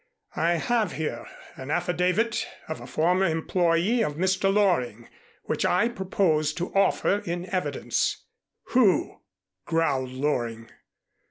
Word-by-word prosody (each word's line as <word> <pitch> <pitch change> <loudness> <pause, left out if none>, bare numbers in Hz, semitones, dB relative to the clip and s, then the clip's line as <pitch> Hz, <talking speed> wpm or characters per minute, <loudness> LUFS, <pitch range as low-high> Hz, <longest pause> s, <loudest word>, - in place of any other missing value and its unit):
"I 165 +2 +2
have 215 - 0
here 130 -5 -4 0.3
an 130 +1 -8
affidavit 180 +7 0 0.2
of 160 - -5
a - - -9
former 180 +4 +2
employee 170 +6 +1
of 150 - -2
Mr. 190 +3 +1
Loring 145 - +1 0.4
which - - -2
I 205 +7 +2
propose 180 -8 0
to 175 +2 -4
offer 200 0 +2
in 175 -1 -4
evidence." 185 - -1 0.5
"Who?" 230 -8 +2 0.5
growled 140 -6 0
Loring. 120 -4 -2
175 Hz, 115 wpm, -26 LUFS, 150-190 Hz, 0.5 s, I